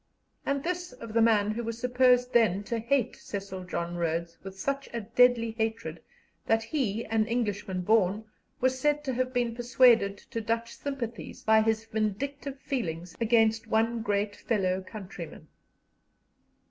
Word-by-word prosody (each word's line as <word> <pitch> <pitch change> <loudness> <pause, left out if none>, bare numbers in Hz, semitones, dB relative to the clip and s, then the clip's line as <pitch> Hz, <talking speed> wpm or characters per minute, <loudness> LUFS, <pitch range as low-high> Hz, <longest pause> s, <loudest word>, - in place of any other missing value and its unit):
And 280 0 0
this 355 -1 -3
of 230 -3 -9
the 230 - +4
man 215 -2 +4
who 235 +2 -3
was 230 0 -4
supposed 250 0 +3
then 205 -4 +3
to 230 +2 -2
hate 250 +2 +1
Cecil 195 -2 -6
John 175 -1 -3
Rhodes 170 0 -1
with 195 0 -9
such 275 +6 -2
a 235 - -2
deadly 230 +1 +3
hatred 220 -7 -3 0.5
that 225 0 +3
he, 225 -4 -1
an 220 0 +1
Englishman 205 -5 -1
born, 210 +1 +2 0.3
was 260 +1 +1
said 295 +2 +1
to 265 -3 -2
have 255 +1 -1
been 245 -2 0
persuaded 235 -4 +4
to 230 +3 -6
Dutch 230 +1 -2
sympathies 250 -5 -5
by 220 0 +5
his 220 0 0
vindictive 265 +6 -3
feelings 175 - -3
against 225 0 +3
one 225 +1 +1
great 205 -1 0
fellow 190 -4 0
countryman. 185 -5 -9
225 Hz, 150 wpm, -28 LUFS, 205-245 Hz, 0.5 s, by